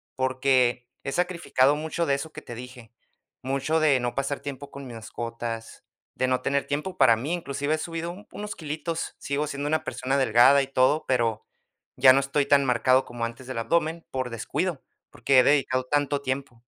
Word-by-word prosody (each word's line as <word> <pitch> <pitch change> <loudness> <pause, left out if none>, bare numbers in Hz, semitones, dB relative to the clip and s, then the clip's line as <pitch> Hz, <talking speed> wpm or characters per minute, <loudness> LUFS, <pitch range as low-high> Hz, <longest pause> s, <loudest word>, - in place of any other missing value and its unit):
porque 130 -2 +1 0.2
he 135 - -3
sacrificado 170 -6 +2
mucho 160 +2 -2
de 140 - +1
eso 155 +3 -6
que - - -8
te 120 - -9
dije, 125 -2 -11 0.5
mucho 140 +4 0
de 140 -4 +4
no 120 0 -3
pasar 140 +1 -2
tiempo 140 0 -7
con 140 -1 -9
mis 120 - -9
mascotas, 115 0 -6 0.3
de 130 - 0
no 130 0 +1
tener 140 0 0
tiempo 150 +6 -3
para 115 -4 +6
mí. 145 +9 -3
Inclusive 145 -3 -2
he - - -4
subido 165 +1 -4
un 200 +4 -12
unos 210 0 -6
quilitos, 160 +1 -4
sigo 145 +2 -2
siendo 140 0 -4
una 155 +1 0
persona 135 +2 -2
delgada 130 +2 +5
y - - -6
todo, 135 +3 +2
pero 115 -4 +1 0.5
ya 130 0 +8
no 135 - +4
estoy 140 +1 0
tan 140 -1 +5
marcado 130 +1 +3
como 120 -1 -4
antes 120 +2 -8
del 130 - -5
abdomen 165 +6 0
por 130 -1 -2
descuido, 135 - -2 0.3
porque 130 +3 +3
he - - +6
dedicado 130 -3 +2
tanto 145 +1 0
tiempo. 130 -3 -4
135 Hz, 190 wpm, -26 LUFS, 125-150 Hz, 0.5 s, ya